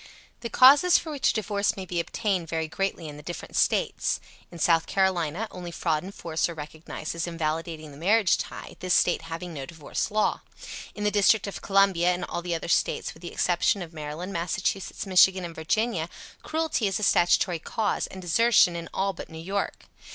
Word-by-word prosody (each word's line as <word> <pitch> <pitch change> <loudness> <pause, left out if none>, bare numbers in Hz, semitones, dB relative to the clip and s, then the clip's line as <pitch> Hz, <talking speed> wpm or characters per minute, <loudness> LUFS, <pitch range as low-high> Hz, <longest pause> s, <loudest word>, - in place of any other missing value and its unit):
The 235 - -5
causes 280 +9 +7
for 320 - -5
which 285 -3 +1
a - - +2
divorce 205 -2 0
may 190 - -5
be 175 -1 -2
obtained 185 -2 -1
vary 160 -1 -1
greatly 180 -1 -3
in 145 -1 -8
the - - -10
different 175 +3 -7
States. - - +1 0.3
In 170 - -11
South 165 0 +3
Carolina 190 0 0
only 180 -1 -7
fraud 165 -2 -1
and 190 - -8
force 165 -3 -2
are 170 - -6
recognized 155 0 -7
as 170 +1 -3
invalidating 160 -1 -3
the 140 - -12
marriage 200 +4 +3
tie, - - -7
this 185 -1 +1
State 175 - +3
having 165 +2 -6
no 135 -3 -6
divorce 160 -3 -4
law. 215 0 +1 0.5
In 210 - -5
the 210 - +2
District 210 +1 +4
of 200 - -6
Columbia 195 -3 +3
and 180 - -4
all - - -4
the 175 -1 -2
other 165 - -5
States 170 - 0
with 160 - -18
the 175 - -7
exception 180 +2 +1
of 165 -1 -11
Maryland, 155 +5 -6
Massachusetts, 180 +4 -2
Michigan 185 -1 +5
and 170 - -7
Virginia, 170 +2 -1 0.3
cruelty 315 -8 -1
is 195 - 0
a - - -4
statutory 175 -1 +3
cause, 210 +5 -1
and 190 -1 -10
desertion 180 0 +4
in 170 -1 -6
all 195 0 0
but - - -9
New 160 - -10
York. 195 +5 -3
175 Hz, 195 wpm, -26 LUFS, 165-200 Hz, 0.5 s, causes